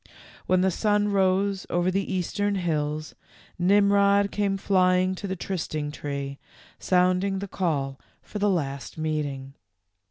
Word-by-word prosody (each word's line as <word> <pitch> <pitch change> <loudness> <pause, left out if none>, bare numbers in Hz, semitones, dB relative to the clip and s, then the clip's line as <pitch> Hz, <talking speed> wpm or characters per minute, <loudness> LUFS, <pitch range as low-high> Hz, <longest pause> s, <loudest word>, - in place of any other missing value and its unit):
When 185 0 +3
the 190 0 +3
sun 210 +2 +1
rose 195 0 +1
over 175 +1 +1
the 195 +2 -1
eastern 200 +2 -1
hills 155 -4 -2 0.5
Nimrod 200 +1 +4
came 200 -1 0
flying 185 -1 +2
to 200 +2 -6
the 190 - -2
trysting 155 -5 -3
tree, 140 -2 -5 0.4
sounding 185 +1 +2
the 200 +1 -4
call 140 -8 -2 0.2
for 210 - -6
the 205 0 +2
last 140 -8 -2
meeting. 145 -4 -3
185 Hz, 130 wpm, -26 LUFS, 155-200 Hz, 0.5 s, Nimrod